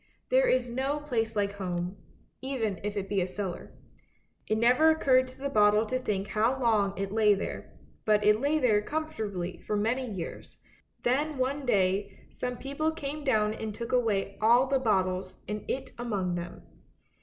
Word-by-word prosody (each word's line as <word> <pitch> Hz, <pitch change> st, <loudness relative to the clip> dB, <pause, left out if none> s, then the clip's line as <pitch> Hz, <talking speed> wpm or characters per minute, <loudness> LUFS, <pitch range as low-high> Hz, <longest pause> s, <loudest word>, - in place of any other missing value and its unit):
There -, -, +4 dB
is 255 Hz, -1 st, +2 dB
no 265 Hz, +4 st, -1 dB
place 230 Hz, -6 st, -2 dB
like 200 Hz, -1 st, +1 dB
home, 180 Hz, -1 st, -3 dB, 0.5 s
even 230 Hz, -8 st, -2 dB
if 210 Hz, 0 st, -3 dB
it 195 Hz, -1 st, -2 dB
be 195 Hz, -1 st, 0 dB
a 180 Hz, -, 0 dB
cellar. 185 Hz, -1 st, -5 dB, 0.8 s
It 215 Hz, -, +1 dB
never 250 Hz, +8 st, +5 dB
occurred 260 Hz, -5 st, +4 dB
to 255 Hz, -, -13 dB
the 280 Hz, -, -2 dB
bottle 210 Hz, -2 st, +4 dB
to 255 Hz, +4 st, -1 dB
think 205 Hz, -5 st, -2 dB
how 230 Hz, +5 st, +1 dB
long 210 Hz, -5 st, +2 dB
it 195 Hz, 0 st, -3 dB
lay 210 Hz, -1 st, +4 dB
there, 195 Hz, -, -6 dB, 0.3 s
but 210 Hz, -1 st, +3 dB
it 210 Hz, +2 st, +4 dB
lay 290 Hz, +3 st, +2 dB
there 225 Hz, -8 st, +3 dB
comfortably 215 Hz, -, -4 dB
for 210 Hz, -, -2 dB
many 240 Hz, +4 st, 0 dB
years; 185 Hz, -5 st, -7 dB, 0.5 s
then 290 Hz, +4 st, +1 dB
one 265 Hz, +1 st, -1 dB
day 195 Hz, -2 st, 0 dB
some 250 Hz, 0 st, -4 dB
people 280 Hz, +5 st, -2 dB
came 300 Hz, -1 st, -5 dB
down 215 Hz, -6 st, +2 dB
and 220 Hz, -1 st, -5 dB
took 235 Hz, +1 st, -5 dB
away 210 Hz, -6 st, 0 dB
all 240 Hz, +4 st, +5 dB
the 270 Hz, 0 st, +1 dB
bottles 185 Hz, -5 st, 0 dB
and 210 Hz, 0 st, -4 dB
it 265 Hz, -, -3 dB
among 200 Hz, -7 st, -1 dB
them. 175 Hz, 0 st, -6 dB
220 Hz, 175 wpm, -29 LUFS, 200-260 Hz, 0.8 s, never